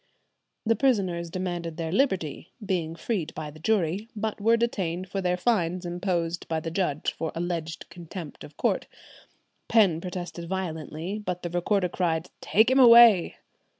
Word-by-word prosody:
"[127:1] -, -, -2 dB
The 230 Hz, -, +5 dB
prisoners 190 Hz, -10 st, +1 dB
demanded 175 Hz, -2 st, -4 dB
their 165 Hz, -1 st, -3 dB
liberty, 185 Hz, -, 0 dB, 0.2 s
"being 165 Hz, -4 st, -1 dB
freed 170 Hz, -3 st, -3 dB
by 155 Hz, -1 st, -5 dB
the 155 Hz, -, -14 dB
jury," 200 Hz, +2 st, 0 dB
but 215 Hz, 0 st, -3 dB
were 230 Hz, +2 st, +4 dB
detained 185 Hz, -6 st, -2 dB
for 195 Hz, +1 st, -3 dB
their 180 Hz, -1 st, 0 dB
fines 180 Hz, -4 st, 0 dB
imposed 175 Hz, -1 st, -2 dB
by 160 Hz, -1 st, -1 dB
the 165 Hz, +1 st, -5 dB
judge 165 Hz, -5 st, -1 dB
for 160 Hz, -, -3 dB
alleged 165 Hz, -1 st, -4 dB
contempt 170 Hz, -1 st, -9 dB
of 145 Hz, -, -13 dB
court. -, -, 0 dB, 0.8 s
Penn 190 Hz, -8 st, +4 dB
protested 175 Hz, -2 st, -6 dB
violently, 175 Hz, +1 st, -4 dB
but 180 Hz, -2 st, -4 dB
the 175 Hz, -, -4 dB
recorder 180 Hz, +2 st, +1 dB
cried, 170 Hz, -1 st, -1 dB
"Take 220 Hz, +4 st, +3 dB
him 265 Hz, -, +4 dB
away!" 235 Hz, -6 st, +8 dB
180 Hz, 155 wpm, -26 LUFS, 165-200 Hz, 0.8 s, away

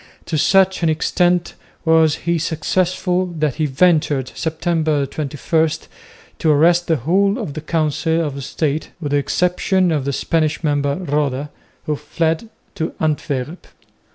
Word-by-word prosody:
To 165 Hz, -, -3 dB
such 190 Hz, +5 st, +3 dB
an 165 Hz, -, +2 dB
extent 175 Hz, +2 st, +1 dB, 0.3 s
was 160 Hz, -1 st, +4 dB
he 170 Hz, -1 st, +1 dB
successful 180 Hz, +3 st, 0 dB
that 150 Hz, -4 st, 0 dB
he 155 Hz, -, +1 dB
ventured, 150 Hz, -3 st, +2 dB
Sept. 160 Hz, -1 st, -4 dB, 0.5 s
21, 155 Hz, +2 st, 0 dB, 0.7 s
to 160 Hz, -, +1 dB
arrest 170 Hz, +4 st, +4 dB
the 165 Hz, -, +3 dB
whole 190 Hz, -, +1 dB
of 210 Hz, -, -5 dB
the 155 Hz, -, -5 dB
Council 160 Hz, +1 st, 0 dB
of 140 Hz, -2 st, -5 dB
State 150 Hz, +2 st, -2 dB
with 145 Hz, -4 st, -4 dB
the 145 Hz, -, +3 dB
exception 180 Hz, +4 st, +1 dB
of 145 Hz, -4 st, -1 dB
the 140 Hz, -, 0 dB
Spanish 155 Hz, +2 st, 0 dB
member 145 Hz, -2 st, +1 dB
Roda, 145 Hz, -4 st, -2 dB, 0.3 s
who 150 Hz, -, 0 dB
fled 160 Hz, +7 st, -2 dB, 0.2 s
to 160 Hz, -, -4 dB
Antwerp. 150 Hz, 0 st, -2 dB
160 Hz, 140 wpm, -19 LUFS, 145-175 Hz, 0.7 s, was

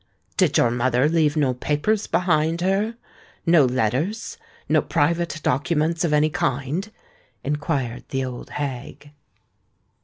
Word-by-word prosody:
"Did -, -, +3 dB
your 120 Hz, -, +4 dB
mother 125 Hz, +2 st, +2 dB
leave 155 Hz, -2 st, +2 dB
no 140 Hz, -4 st, +2 dB
papers 150 Hz, -, 0 dB
behind 165 Hz, -1 st, +1 dB
her—no 195 Hz, -, 0 dB
letters—no 155 Hz, -, -1 dB
private 170 Hz, +1 st, 0 dB
documents 155 Hz, +5 st, +1 dB
of 170 Hz, -, +1 dB
any 150 Hz, +1 st, +3 dB
kind?" 165 Hz, -, -2 dB, 0.5 s
inquired 140 Hz, -4 st, -2 dB
the 135 Hz, -1 st, -1 dB
old 125 Hz, -1 st, -7 dB
hag. 145 Hz, 0 st, -6 dB
150 Hz, 110 wpm, -23 LUFS, 130-170 Hz, 0.5 s, your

